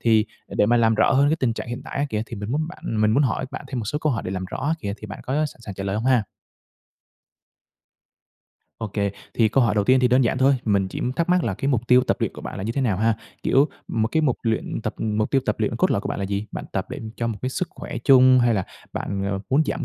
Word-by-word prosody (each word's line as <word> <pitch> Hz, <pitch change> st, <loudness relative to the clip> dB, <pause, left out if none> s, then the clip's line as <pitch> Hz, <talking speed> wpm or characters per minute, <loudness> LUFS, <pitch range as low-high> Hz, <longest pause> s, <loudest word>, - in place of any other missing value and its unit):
Thì 110 Hz, -2 st, +3 dB, 0.2 s
để 105 Hz, -, +2 dB
mà 120 Hz, +2 st, +4 dB
làm 115 Hz, -1 st, +4 dB
rõ 110 Hz, -, +3 dB
hơn 140 Hz, +2 st, +4 dB
cái 160 Hz, -, +2 dB
tình 130 Hz, -7 st, +1 dB
trạng 115 Hz, -, -6 dB
hiện 120 Hz, +1 st, -5 dB
tại -, -, -5 dB
á 145 Hz, -, +2 dB
kìa, 105 Hz, 0 st, -1 dB
thì 115 Hz, -, -7 dB
mình 100 Hz, +2 st, -5 dB
muốn 155 Hz, +4 st, -1 dB
bạn 115 Hz, -10 st, -4 dB
mình 110 Hz, 0 st, +4 dB
muốn 135 Hz, +7 st, +3 dB
hỏi 130 Hz, 0 st, 0 dB
bạn -, -, -7 dB
thêm 130 Hz, -, -3 dB
một 110 Hz, -, -3 dB
số 145 Hz, +7 st, -2 dB
câu 155 Hz, -3 st, +1 dB
hỏi 110 Hz, -, -2 dB
để -, -, -4 dB
làm 95 Hz, -1 st, -3 dB
rõ 95 Hz, -, -6 dB
á 160 Hz, -, +2 dB
kìa, 100 Hz, -6 st, -3 dB
thì 110 Hz, -, -9 dB
bạn 100 Hz, -, -8 dB
có 130 Hz, -, -3 dB
sẵn 140 Hz, -, -13 dB
sàng 105 Hz, -4 st, -8 dB
trả 95 Hz, 0 st, -5 dB
lời 100 Hz, +1 st, -1 dB
hông 110 Hz, -, -2 dB
ha? 130 Hz, -3 st, +4 dB, 2.6 s
OK, 110 Hz, -3 st, -5 dB, 0.4 s
thì 110 Hz, -2 st, +4 dB
câu 130 Hz, +3 st, +3 dB
hỏi 105 Hz, -3 st, +2 dB
đầu 105 Hz, -1 st, +2 dB
tiên 130 Hz, +2 st, +4 dB
thì 125 Hz, -, +4 dB
đơn 125 Hz, +2 st, +4 dB
giản 120 Hz, -, +1 dB
thôi, 135 Hz, +1 st, +5 dB
mình 100 Hz, -3 st, +2 dB
chỉ -, -, -6 dB, 0.2 s
thắc 170 Hz, +2 st, 0 dB
mắc 180 Hz, -1 st, +3 dB
là 105 Hz, -, -1 dB
cái 135 Hz, -, -2 dB
mục 120 Hz, -4 st, 0 dB
tiêu 125 Hz, 0 st, +6 dB
tập -, -, +1 dB
luyện -, -, 0 dB
của -, -, -10 dB
bạn -, -, -6 dB
là 95 Hz, -, -4 dB
như 115 Hz, -, -2 dB
thế 140 Hz, -, -1 dB
nào 115 Hz, -8 st, +1 dB
ha? 110 Hz, +3 st, +2 dB, 0.3 s
Kiểu, 140 Hz, +3 st, +4 dB, 0.2 s
một 110 Hz, 0 st, 0 dB
cái 160 Hz, -, +3 dB
mục 135 Hz, -6 st, +1 dB
luyện 115 Hz, -1 st, -1 dB
tập 110 Hz, -, -3 dB
mục 110 Hz, -1 st, -1 dB
tiêu 135 Hz, -, +3 dB
tập -, -, +1 dB
luyện -, -, 0 dB
cốt -, -, +2 dB
lõi -, -, +2 dB
của -, -, -5 dB
bạn -, -, -3 dB
là 100 Hz, -, -2 dB
gì? 100 Hz, +2 st, -2 dB
Bạn -, -, -5 dB
tập -, -, -2 dB
để -, -, -5 dB, 0.2 s
cho 115 Hz, -, -1 dB
một 110 Hz, -3 st, -3 dB
cái 130 Hz, -, 0 dB
sức 180 Hz, +6 st, -2 dB
khỏe 120 Hz, -, -7 dB
chung 130 Hz, -1 st, +7 dB
hay 120 Hz, -1 st, +3 dB
là 95 Hz, -3 st, 0 dB, 0.3 s
bạn 100 Hz, 0 st, -2 dB
muốn 140 Hz, +4 st, +4 dB
giảm 150 Hz, -, -2 dB
115 Hz, 295 wpm, -23 LUFS, 105-130 Hz, 2.6 s, chung